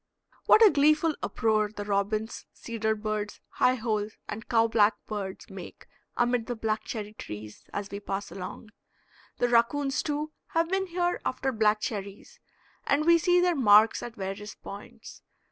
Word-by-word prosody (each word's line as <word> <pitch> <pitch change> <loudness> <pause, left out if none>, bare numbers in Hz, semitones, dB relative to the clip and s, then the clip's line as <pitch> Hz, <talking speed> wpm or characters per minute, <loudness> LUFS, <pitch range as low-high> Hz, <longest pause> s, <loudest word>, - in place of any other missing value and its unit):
What 450 - +8
a 410 - +7
gleeful 305 +2 +3
uproar 215 -2 +1
the 205 -1 -6
robins, 210 +2 -1
cedar 220 -2 -2
birds, 210 -1 -3
high 255 - +2
holes, 215 -3 -2
and 220 +2 -7
cow 225 -1 +4
black 220 -2 +3
birds 200 -3 -5
make - - -10 0.3
amid 240 -1 +1
the 245 - -2
black 220 -1 -1
cherry 210 -2 -5
trees 105 - -9
as 200 -1 -5
we 200 - -4
pass 200 0 -4
along. 195 +4 -8 0.7
The 245 - +2
raccoons, 265 +4 +2
too, 300 0 -3 0.2
have 330 0 +2
been 385 0 0
here 350 0 -1
after 265 +1 -1
black 215 -2 +2
cherries, 205 - -6 0.5
and 295 +2 +2
we 340 0 +6
see 355 +1 +4
their 355 0 +3
marks 220 -4 +5
at 240 -1 -7
various 195 0 -6
points. 220 +3 -11
220 Hz, 160 wpm, -28 LUFS, 210-275 Hz, 0.7 s, What